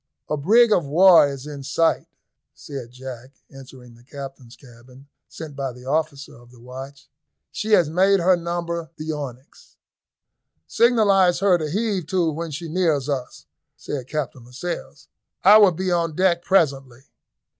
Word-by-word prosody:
"A -, -, +2 dB
brig 220 Hz, +11 st, +4 dB
of 175 Hz, -, +2 dB
war 170 Hz, +2 st, +6 dB
is 140 Hz, -1 st, -7 dB
in 145 Hz, -2 st, -8 dB
sight," 145 Hz, +4 st, 0 dB, 0.5 s
said 135 Hz, -5 st, -9 dB
Jack, 130 Hz, 0 st, -10 dB, 0.2 s
entering 130 Hz, -2 st, -14 dB
the 115 Hz, -, -19 dB
captain's 135 Hz, -2 st, -10 dB
cabin, 125 Hz, +2 st, -17 dB, 0.2 s
sent 155 Hz, -3 st, -9 dB
by 135 Hz, -2 st, -4 dB
the 125 Hz, +1 st, -14 dB
officer 145 Hz, 0 st, -3 dB
of 120 Hz, 0 st, -19 dB
the 120 Hz, -1 st, -19 dB
watch; 130 Hz, +3 st, -11 dB, 0.4 s
"she 215 Hz, 0 st, -2 dB
has 175 Hz, -6 st, +5 dB
made 190 Hz, +5 st, +3 dB
her 180 Hz, +2 st, +4 dB
number 170 Hz, -1 st, -4 dB
the 155 Hz, +1 st, -4 dB
Onyx." 135 Hz, -3 st, -9 dB, 0.9 s
"Signalise 200 Hz, -7 st, +3 dB
her 185 Hz, -1 st, +3 dB
to 155 Hz, -1 st, -3 dB
heave 200 Hz, -2 st, -2 dB
to 175 Hz, -2 st, 0 dB
when 165 Hz, +2 st, -5 dB
she 155 Hz, +3 st, -6 dB
nears 160 Hz, -5 st, 0 dB
us," 125 Hz, -, -5 dB, 0.3 s
said 130 Hz, -4 st, -6 dB
Captain 140 Hz, -5 st, -5 dB
Lascelles. 135 Hz, +3 st, -7 dB, 0.4 s
"I 205 Hz, +3 st, +8 dB
will 200 Hz, -3 st, +6 dB
be 185 Hz, +2 st, -3 dB
on 170 Hz, -3 st, -1 dB
deck 180 Hz, -1 st, +2 dB
presently." 135 Hz, -9 st, 0 dB
150 Hz, 155 wpm, -22 LUFS, 135-175 Hz, 0.9 s, I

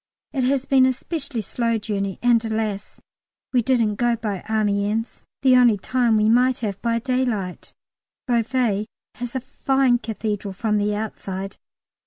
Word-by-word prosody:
It 265 Hz, -3 st, 0 dB
has 270 Hz, 0 st, +1 dB
been 265 Hz, -2 st, +5 dB
a 260 Hz, -, +2 dB
specially 270 Hz, -3 st, -4 dB
slow 230 Hz, +2 st, -1 dB
journey, 200 Hz, -3 st, -3 dB
and, 235 Hz, -2 st, +4 dB
alas! 220 Hz, -2 st, -3 dB, 0.5 s
we 250 Hz, -, +4 dB
didn't 230 Hz, -4 st, +1 dB
go 240 Hz, 0 st, +2 dB
by 210 Hz, -4 st, -4 dB
Amiens: 210 Hz, +1 st, -1 dB, 0.2 s
the 260 Hz, -1 st, +6 dB
only 240 Hz, -4 st, +5 dB
time 235 Hz, +2 st, +1 dB
we 215 Hz, 0 st, +3 dB
might 250 Hz, +3 st, +4 dB
have, 200 Hz, -4 st, -3 dB
by 230 Hz, -1 st, +1 dB
daylight. 235 Hz, -7 st, -2 dB, 0.5 s
Beauvais 235 Hz, -3 st, +1 dB, 0.3 s
has 245 Hz, +1 st, -5 dB
a 260 Hz, -, -1 dB
fine 265 Hz, -1 st, +1 dB
Cathedral 210 Hz, -3 st, -4 dB
from 210 Hz, +1 st, 0 dB
the 205 Hz, 0 st, 0 dB
outside. 195 Hz, -2 st, -5 dB
230 Hz, 150 wpm, -22 LUFS, 210-250 Hz, 0.5 s, the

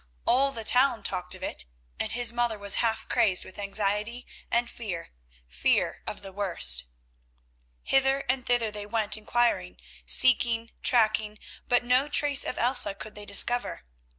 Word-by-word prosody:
All 275 Hz, +3 st, +2 dB
the 230 Hz, -4 st, -7 dB
town 250 Hz, +1 st, +2 dB
talked 180 Hz, 0 st, -2 dB
of -, -, -12 dB
it, -, -, -4 dB, 0.3 s
and -, -, -2 dB
his 235 Hz, 0 st, +2 dB
mother 240 Hz, -2 st, -1 dB
was 200 Hz, -1 st, +3 dB
half 225 Hz, -1 st, -1 dB
crazed 215 Hz, -7 st, +1 dB
with 190 Hz, -, -12 dB
anxiety 210 Hz, +4 st, -2 dB, 0.2 s
and 235 Hz, +1 st, 0 dB
fear, 195 Hz, -9 st, -7 dB, 0.4 s
fear 60 Hz, +1 st, -1 dB
of -, -, -6 dB
the 195 Hz, -, -5 dB
worst. 165 Hz, -, +2 dB, 1.0 s
Hither 270 Hz, 0 st, +1 dB
and 255 Hz, 0 st, -1 dB
thither 240 Hz, -3 st, -1 dB
they 205 Hz, 0 st, -8 dB
went 215 Hz, -1 st, +1 dB
inquiring, 215 Hz, -, -1 dB, 0.3 s
seeking, 230 Hz, -, +2 dB
tracking, 215 Hz, -3 st, +2 dB, 0.3 s
but 245 Hz, 0 st, +2 dB
no 250 Hz, +3 st, +1 dB
trace 290 Hz, -1 st, +5 dB
of -, -, -5 dB
Elsa 240 Hz, -5 st, +3 dB
could 215 Hz, +2 st, -9 dB
they 210 Hz, 0 st, -9 dB
discover. 245 Hz, -, +2 dB
230 Hz, 150 wpm, -26 LUFS, 205-245 Hz, 1.0 s, trace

